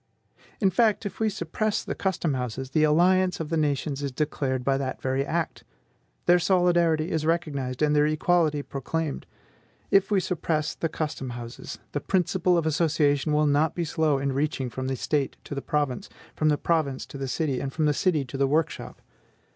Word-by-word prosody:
In 195 -3 +3
fact, 220 +2 +2
if 200 -2 -5
we 220 -1 +2
suppress 205 +3 -2
the - - -3
custom 175 -5 -1
houses, 130 +1 -4
the 155 +2 +3
alliance 180 +4 +3
of 160 -2 -4
the 165 - 0
nations 145 -2 0
is 140 -1 -2
declared 130 -2 -1
by 135 +1 +2
that 130 -1 -3
very 130 +1 0
act; 165 +3 -2 0.6
their 175 0 +5
solidarity 175 -3 +2
is 160 -1 0
recognized, 150 -5 -1
and 150 0 +3
their 150 0 +4
equality 155 -1 +2
proclaimed. 145 +3 -3 0.6
If 195 0 +4
we 205 -2 +3
suppress 160 -4 -1
the 165 - -2
custom 150 -4 -4
houses, 120 0 -7
the 145 - -2
principle 180 -1 +2
of 165 - 0
association 155 -2 +2
will 150 0 +3
not 150 +2 +2
be 170 - -1
slow 155 -2 +1
in 135 0 -1
reaching 135 -2 -1
from 130 +2 -4
the 135 - -1
State 140 +2 -1
to - - -7
the 140 - -3
province, 150 +5 -1 0.3
from 155 - +2
the 150 - +2
province 150 -5 0
to 140 - -9
the 135 - -3
city, 135 -1 -1
and 135 - -3
from 155 +2 0
the 150 - +3
city 155 -2 +1
to 130 +2 -7
the 135 0 +2
workshop. 155 +4 -2
155 Hz, 190 wpm, -26 LUFS, 140-170 Hz, 0.6 s, their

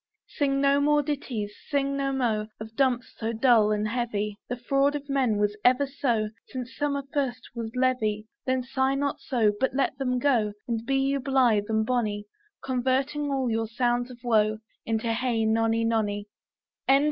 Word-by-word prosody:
Sing 275 -2 0
no 280 0 +3
more 295 0 +3
ditties, 250 -8 -3 0.2
sing 275 -1 +1
no 275 0 0
mo 230 -5 0
Of 220 +1 -9
dumps 255 -2 +1
so 225 0 -2
dull 225 -2 +4
and 210 0 0
heavy; 210 -3 -2
The 245 - -1
fraud 275 +4 +1
of 285 -1 -5
men 265 -6 +1
was 205 0 +1
ever 255 +3 +4
so, 240 -6 -1 0.2
Since 255 -1 -6
summer 285 -1 -1
first 255 -4 -1
was 230 -1 -5
leavy. 225 -5 +1 0.2
Then 260 -1 0
sigh 265 +1 0
not 280 0 -1
so, 225 -5 +1
But 265 0 0
let 275 -1 +1
them 250 -2 0
go, 240 -6 +2
And 230 -2 -2
be 270 0 +2
you 275 +1 +1
blith 250 -6 +2
and 220 0 +1
bonny, 215 -4 -1 0.4
Converting 265 +3 0
all 265 -3 0
your 225 0 0
sounds 240 +2 0
of 250 - -10
woe 215 -2 +3 0.3
Into 225 0 0
Hey 230 -2 0
nonny, 225 +1 +2
nonny. 205 -3 0
245 Hz, 170 wpm, -27 LUFS, 220-270 Hz, 0.4 s, dull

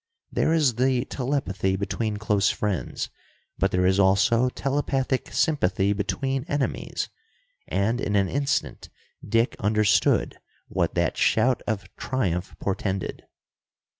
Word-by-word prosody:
There - - +1
is 150 -8 +3
the 130 0 +2
telepathy 125 -10 -1
between 105 +2 -2
close 105 -2 +2
friends, 105 -4 -2 0.5
but 95 - +3
there 90 -1 +1
is 95 +1 +3
also 110 +6 +4
telepathic 135 -1 -1
sympathy 100 - +2
between 135 +6 -2
enemies, 145 -3 -2 0.6
and 110 +6 0
in 105 - -1
an 100 -1 +3
instant 140 +4 -1 0.3
Dick 115 +3 +1
understood 105 0 +2 0.3
what - - -1
that - - +1
shout 120 +2 +3
of 110 -4 -1
triumph 95 -9 -2
portended. 95 -1 -3
110 Hz, 115 wpm, -25 LUFS, 100-130 Hz, 0.6 s, also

